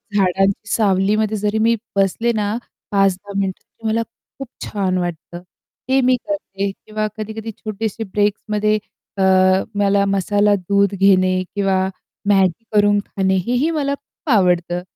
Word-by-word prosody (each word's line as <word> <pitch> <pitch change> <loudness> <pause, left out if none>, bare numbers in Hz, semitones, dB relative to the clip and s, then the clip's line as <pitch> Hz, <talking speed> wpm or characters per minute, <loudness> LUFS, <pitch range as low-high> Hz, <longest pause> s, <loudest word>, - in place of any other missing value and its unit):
झाडांची 195 +1 +1
सावलीमध्ये 210 +1 +2
जरी 210 +1 -1
मी 230 +1 +3 0.2
बसले 200 +4 +1
ना 210 0 -1 0.4
5-10 195 0 +1
मिनिटं 190 -1 -3 0.2
तर 225 - -3
मला 220 +1 +1 0.4
खूप 270 - -5 0.2
छान 190 -3 -1
वाटतं 175 0 -5 0.5
ते 265 +1 +4
मी 255 0 +4
करते 200 -10 -3
किंवा 215 +2 -4
कधी-कधी 220 +1 -5
छोटेसे 215 +1 -4
ब्रेक्समध्ये 210 +1 0 0.4
अ, - - -1 0.5
मला 200 0 +2
मसाला 205 +1 +2
दूध 200 +1 +1
घेणे 185 -1 +3
किंवा 195 -2 +1 0.5
Maggi 190 0 +3
करून 205 -1 +4
खाणे 190 -1 0
हेही 250 +6 +1
मला 285 -3 -1
खूप 285 +2 -14
आवडतं 180 -3 +2
205 Hz, 130 wpm, -19 LUFS, 195-215 Hz, 0.5 s, ते